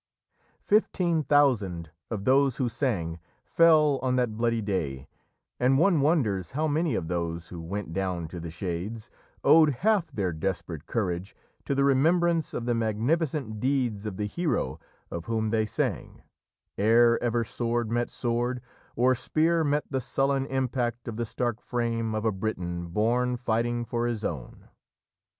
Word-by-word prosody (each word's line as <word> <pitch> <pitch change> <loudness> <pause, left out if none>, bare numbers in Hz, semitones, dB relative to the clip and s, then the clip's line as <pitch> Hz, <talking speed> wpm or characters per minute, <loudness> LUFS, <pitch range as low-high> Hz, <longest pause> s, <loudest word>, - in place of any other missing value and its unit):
Fifteen 180 -6 +2
thousand 110 - +2 0.2
of 105 -4 -4
those 135 -1 +3
who 130 - 0
sang 95 - -2 0.3
fell 155 -4 +4
on 130 -1 +1
that 125 -4 0
bloody 115 0 +1
day, 75 -11 -3 0.5
and 130 +2 +3
one 170 -1 +4
wonders 110 - +1
how 155 +3 0
many 155 -2 +1
of 80 - -2
those 85 -1 -3
who 85 -2 -7
went 90 0 -5
down 90 -3 -2
to 85 - -7
the 85 0 -6
Shades 95 +7 -5 0.3
owed 155 -1 +7 0.2
half 200 -7 +3
their 95 -9 -1
desperate 85 -2 -4
courage 95 -4 -2 0.3
to 140 - -1
the 140 - +2
remembrance 165 +4 +3
of 115 - -4
the 120 - +1
magnificent 115 +2 -1
deeds 125 -5 0
of 95 -3 -5
the 105 - -1
hero 105 - -1 0.3
of 85 -1 -5
whom 110 -1 -1
they 110 -1 +1
sang, - - -3 0.6
ere 115 +3 +5
ever 120 -1 +1
sword 115 0 -2
met 120 0 0
sword, 120 +1 -1 0.4
or 125 +2 +4
spear 160 +6 +1
met 150 0 +1
the 130 -1 0
sullen 135 +1 0
impact 125 -3 -2
of 115 - -4
the 115 0 -3
stark 120 0 -2
frame 115 -2 -2
of 110 +1 -2
a 110 - +3
Briton 90 -4 -3
born, 120 +7 +1
fighting 120 0 -1
for 120 0 -1
his 115 -3 -3
own. 70 -8 -6
115 Hz, 155 wpm, -27 LUFS, 100-135 Hz, 0.6 s, owed